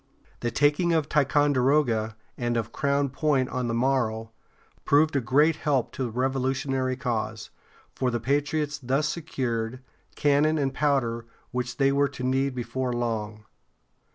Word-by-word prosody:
The 120 - -1
taking 150 +7 +2
of 160 -3 +1
Ticonderoga, 135 -5 +2 0.2
and 120 -1 -1
of 115 - -2
Crown 140 -1 0
Point 135 -2 +1
on 125 -1 -2
the 115 - -1
morrow, 115 -3 0 0.5
proved 150 +1 +3
a 140 - +2
great 145 +6 +3
help 140 -6 0
to 130 - -3
the - - -3
Revolutionary 130 +1 -1
cause, 120 -4 -3 0.4
for 130 - 0
the 120 -1 -1
patriots 145 +4 -1
thus 135 +3 0
secured, 130 -7 -3 0.4
cannon 150 +2 +3
and 135 -2 0
powder 120 -6 0 0.2
which 125 -1 -3
they 135 -1 +3
were 140 0 +2
to 135 -2 -8
need 130 +1 0
before 125 +1 -2
long. 110 -3 -3
130 Hz, 145 wpm, -26 LUFS, 120-145 Hz, 0.5 s, proved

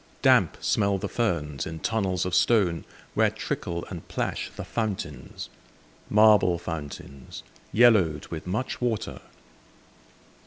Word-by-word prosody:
Damp - - +4
smell 100 -2 +2
the - - -3
ferns 75 - -1
in 80 - -6
tunnels 95 +1 -1
of 90 - -3
stone, 90 -7 +3 0.3
Where - - +3
trickle 85 0 -4
and 85 -3 -7
plash - - -3
the - - -5
fountains, 95 - -4 0.6
Marble 105 -4 +5
fountains, 75 -6 -7 0.3
yellowed 105 -10 +4
with 80 +1 -6
much 110 +9 -3
water. 115 -4 -2
90 Hz, 115 wpm, -26 LUFS, 80-110 Hz, 0.6 s, Marble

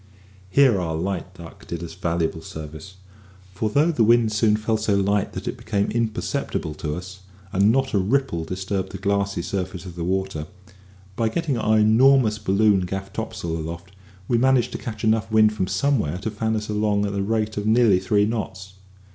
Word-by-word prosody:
Here 125 -4 +4
our 80 -2 -2
light 90 +2 -3
duck 85 -2 -12
did 85 0 -5
us 85 - -7
valuable 85 -2 -2
service, 80 +4 -9 0.6
for 105 +4 -1
though 150 +9 +3
the 125 -8 +2
wind 115 0 +4
soon 105 0 +3
fell 110 +1 0
so 105 -1 +1
light 100 0 +1
that - - -6
it - - -3
became 100 -2 -1
imperceptible 105 -8 -2
to 75 -1 -3
us, 90 +2 -8 0.3
and 100 +3 +4
not 135 +2 0
a 100 - +3
ripple 110 -3 0
disturbed 95 +3 -3
the - - -4
glassy 100 -2 -1
surface 95 -1 -4
of 90 -2 -9
the 85 - -4
water, 95 -4 -2 0.7
by 115 0 +1
getting 155 +1 -1
our 110 -2 +2
enormous 110 +1 +4
balloon 105 0 +3
gaff 95 +1 -5
topsail 110 -7 -4
aloft 85 +3 -6 0.4
we 120 - +2
managed 130 -1 +3
to - - -5
catch 110 -4 -7
enough 110 -1 +1
wind 110 -1 +5
from 95 -3 -1
somewhere 95 - 0
to 105 +4 -4
fan 110 +1 -1
us 105 -1 -3
along 105 -1 +1
at 100 - -3
the 100 - -1
rate 110 +1 -1
of 105 +1 -3
nearly 110 -4 +4
three 100 +2 +2
knots. 95 -4 -4
100 Hz, 190 wpm, -23 LUFS, 95-110 Hz, 0.7 s, wind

